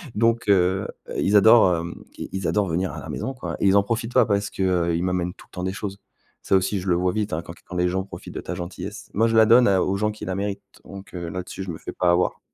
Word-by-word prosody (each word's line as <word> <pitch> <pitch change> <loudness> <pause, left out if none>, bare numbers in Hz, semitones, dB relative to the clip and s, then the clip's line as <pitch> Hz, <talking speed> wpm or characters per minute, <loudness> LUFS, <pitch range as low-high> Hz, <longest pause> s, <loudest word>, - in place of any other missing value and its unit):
Donc 115 +1 +2
heu, 95 0 +3 0.3
ils 100 - +2
adorent, 105 -4 +6
hem, 85 +1 -5 0.2
ils - - -5
ils 95 -1 -3
adorent 105 -2 +1
venir 90 +2 -1
à - - -6
la - - -9
maison 135 - -3
quoi 125 - -5
et - - +2
ils 95 - +5
en 100 - +4
profitent 115 +3 -3
pas, - - +5
parce 100 0 0
qu'ils 85 -2 0
m'amènent 90 -1 -1
tout - - -17
le - - -49
temps 90 - -5
des 95 - -1
choses. 100 0 -5 0.4
Ça - - +1
aussi 95 +2 0
je 95 - -7
le 90 - +4
vois 90 +1 +1
vite, 105 -1 -2
hein, 80 - -1
quand 85 0 -10
quand 90 - -9
les 90 0 +2
gens 95 +1 -1
profitent 100 - -10
de - - -4
ta 90 - -5
gentillesse. 90 +4 -7
Moi 115 +2 +3
je 115 - 0
la 110 - +7
donne 120 +2 +6
à 95 -2 +3
aux 95 - 0
gens 105 +1 0
qui 105 - -8
la 95 - -3
méritent, 100 0 -3 0.2
donc 100 0 -11
heu, 85 -2 -5
là-dessus 90 +2 -6
je 95 - -5
me 80 - -6
fais - - -7
pas 90 -1 +2
avoir. 90 +1 +1
95 Hz, 280 wpm, -23 LUFS, 90-105 Hz, 0.4 s, la